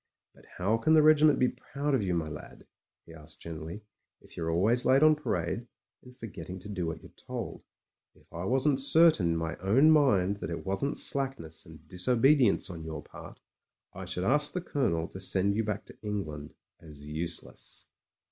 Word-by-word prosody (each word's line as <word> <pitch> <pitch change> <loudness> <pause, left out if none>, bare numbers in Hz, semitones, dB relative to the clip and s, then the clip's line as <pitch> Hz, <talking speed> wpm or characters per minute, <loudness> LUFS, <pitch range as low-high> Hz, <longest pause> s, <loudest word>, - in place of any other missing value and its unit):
"But - - -20
how 105 +5 +1
can 155 +8 +3
the 155 - +6
regiment 155 -1 +5
be 125 - +3
proud 145 +1 -4
of 130 - +2
you, 90 -3 -1
my 85 -2 -1
lad," 75 -1 -10 0.4
he 80 - -13
asked 80 -1 -11
gently, 85 +5 -8 0.4
"if - - -17
you're 80 -1 -3
always 105 +9 +2
late 135 +3 +4
on 155 0 +7
parade, 115 - -3 0.3
and 125 0 -16
forgetting 95 -5 -8
to 105 - -10
do 90 -5 -3
what 80 -1 -6
you're - - -14
told? - - -7 0.5
If - - -25
I 85 +2 -5
wasn't 135 +4 +2
certain 155 - +5
in - - -1
my 80 -1 -3
own 130 +12 +4
mind 100 -11 +3
that - - -6
it 85 - -5
wasn't 95 +9 -1
slackness 130 - -1
and 80 -1 -15
disobedience 125 - +3
on 85 -3 -8
your 80 -2 -6
part, - - -12 0.5
I - - -7
should 90 - -3
ask 145 +8 +2
the 180 - -2
Colonel 100 - -1
to 95 - -10
send 95 +1 +1
you 110 +2 0
back 105 -1 -3
to - - -14
England 80 -9 -5 0.2
as 75 -3 -13
useless." 80 +3 -4
100 Hz, 185 wpm, -29 LUFS, 80-135 Hz, 0.5 s, on